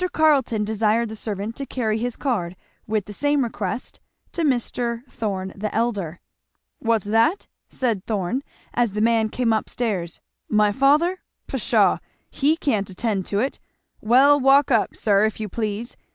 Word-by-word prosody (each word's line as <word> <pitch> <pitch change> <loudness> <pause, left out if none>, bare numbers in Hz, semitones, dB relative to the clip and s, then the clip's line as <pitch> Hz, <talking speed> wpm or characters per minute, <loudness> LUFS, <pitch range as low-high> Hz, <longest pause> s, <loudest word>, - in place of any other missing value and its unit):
Carleton 275 -8 +3
desired 220 +2 +1
the 220 - -6
servant 210 +1 -4
to 280 - -3
carry 220 -4 -1
his 245 +1 -2
card, 185 -10 -2 0.3
with 215 -2 -1
the 205 - -8
same 290 +4 +1
request, 220 -1 -4 0.3
to 340 - -3
Mr, 240 -4 -1
Thorn 195 -6 -4
the 210 +2 -3
elder. 205 -8 -1 0.6
"What's 225 -3 +1
that?" 225 - +2 0.2
said 230 -7 -1
Thorn 210 +4 -1 0.3
as 240 -4 +1
the 210 - -2
man 225 -1 +3
came 235 0 +1
up 220 - -1
stairs, 195 -8 -3 0.3
"my 210 -1 +3
father? 295 - +3 0.3
Pshaw! - - +2 0.3
he 300 +4 +2
can't 215 - 0
attend 195 0 -2
to 200 - -1
it 260 +6 -1 0.4
Well, 270 +6 +5
walk 270 +1 +5
up, 225 -4 +2
sir, 200 -1 +3
if 220 - -2
you 215 - -3
please! 215 +2 -3
225 Hz, 155 wpm, -23 LUFS, 210-255 Hz, 0.6 s, Well